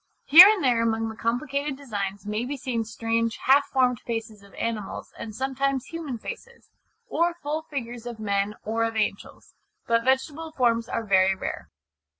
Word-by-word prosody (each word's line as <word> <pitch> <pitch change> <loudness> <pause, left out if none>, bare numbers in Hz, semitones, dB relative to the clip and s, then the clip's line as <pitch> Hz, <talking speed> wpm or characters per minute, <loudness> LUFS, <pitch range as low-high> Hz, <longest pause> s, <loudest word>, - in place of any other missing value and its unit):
Here 340 +6 +11
and 425 -6 +1
there 245 -3 +3
among 225 -1 0
the 220 - -8
complicated 270 +5 -2
designs 200 -7 -5
may 210 +2 -2
be 280 +3 -4
seen 245 -3 -2
strange 230 0 -1
half 280 +2 +5
formed 250 -4 +1
faces 225 -3 -5
of 200 0 -18
animals, 220 -3 -4
and 215 -2 -8
sometimes 265 +1 -1
human 320 -7 -5
faces, 475 - -10 0.4
or 340 -4 0
full 310 -1 -3
figures 245 -4 -5
of 235 -2 -7
men 200 0 -1
or 225 +2 -1
of 225 0 -2
angels. 210 -2 -3 0.3
But 230 0 +2
vegetable 290 +5 -1
forms 235 -4 +1
are 230 - -2
very 190 -1 +4
rare. - - -6
235 Hz, 165 wpm, -25 LUFS, 220-275 Hz, 0.4 s, Here